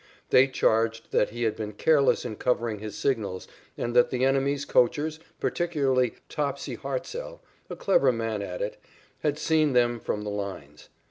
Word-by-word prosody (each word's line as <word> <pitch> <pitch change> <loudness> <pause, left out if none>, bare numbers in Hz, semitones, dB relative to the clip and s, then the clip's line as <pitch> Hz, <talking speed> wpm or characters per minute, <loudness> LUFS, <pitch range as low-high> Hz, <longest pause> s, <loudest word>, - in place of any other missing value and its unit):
They 130 +1 +7
charged 115 -3 +1
that - - +2
he 120 +2 -4
had 110 -2 +1
been 105 -1 -5
careless 140 +5 +3
in 110 -3 -5
covering 120 -4 0
his 105 -1 -7
signals 105 -9 -1 0.3
and 120 0 -3
that 120 - +5
the 130 0 +1
enemy's 135 +1 +1
coachers, 155 +5 +2 0.2
particularly 135 -8 +1
Topsy 145 -2 -3
Hartsell, - - -5 0.3
a - - -5
clever 140 -9 +3
man 115 -3 -2
at 90 -2 -4
it, 105 - -4 0.4
had 150 -1 0
seen 155 -2 +2
them 120 -1 +3
from 105 -1 -3
the 105 - -4
lines. 95 -8 -6
125 Hz, 160 wpm, -27 LUFS, 110-140 Hz, 0.4 s, They